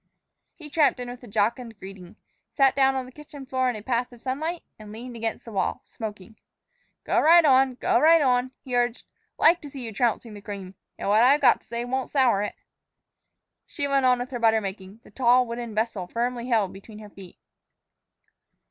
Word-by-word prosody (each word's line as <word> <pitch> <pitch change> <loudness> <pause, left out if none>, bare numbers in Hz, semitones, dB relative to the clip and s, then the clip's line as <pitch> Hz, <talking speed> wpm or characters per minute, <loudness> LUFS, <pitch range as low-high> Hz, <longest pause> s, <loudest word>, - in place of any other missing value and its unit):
He 310 - -11
tramped 295 -3 +2
in 245 0 -5
with 245 - -11
a - - -11
jocund 225 +2 -1
greeting, 190 -2 -11 0.3
sat 270 -2 +3
down 270 -1 +3
on 260 -1 -2
the 255 - -13
kitchen 290 0 -12
floor 260 -1 0
in 245 - -3
a 210 - -8
path 245 +1 -1
of 240 - -15
sunlight, 310 +8 -4 0.2
and 210 -1 -11
leaned 240 +3 -9
against 225 -1 -4
the 230 - -9
wall, 195 - -2
smoking. 215 -1 -9 0.7
"Go - - +1
right 335 +1 +6
on 265 -2 +4
go - - +1
right 325 +2 +6
on," 255 -3 +2
he 250 -2 -4
urged. 245 0 0 0.3
"Like 340 +2 +4
to 290 - -9
see 270 -2 -8
you 225 - -7
trouncing 230 0 -1
the 205 - -10
cream. 200 -3 -8 0.2
And - - -5
what 210 +2 +4
I've 270 +4 +5
got 250 -4 +4
to - - -21
say 235 +1 -4
won't 260 +1 -3
sour 250 -8 +2
it." 210 - -4 1.1
She 285 -3 -3
went 275 -2 +2
on 250 0 +4
with 245 +2 -6
her 245 - -4
butter 225 -1 +3
making, 195 +1 -8
the - - -18
tall, 250 0 +3
wooden 235 -1 -6
vessel 215 -4 -2
firmly 240 +3 -3
held 220 -6 +1
between 205 +3 -12
her 210 -1 -11
feet. 190 -3 -13
245 Hz, 205 wpm, -25 LUFS, 215-265 Hz, 1.1 s, right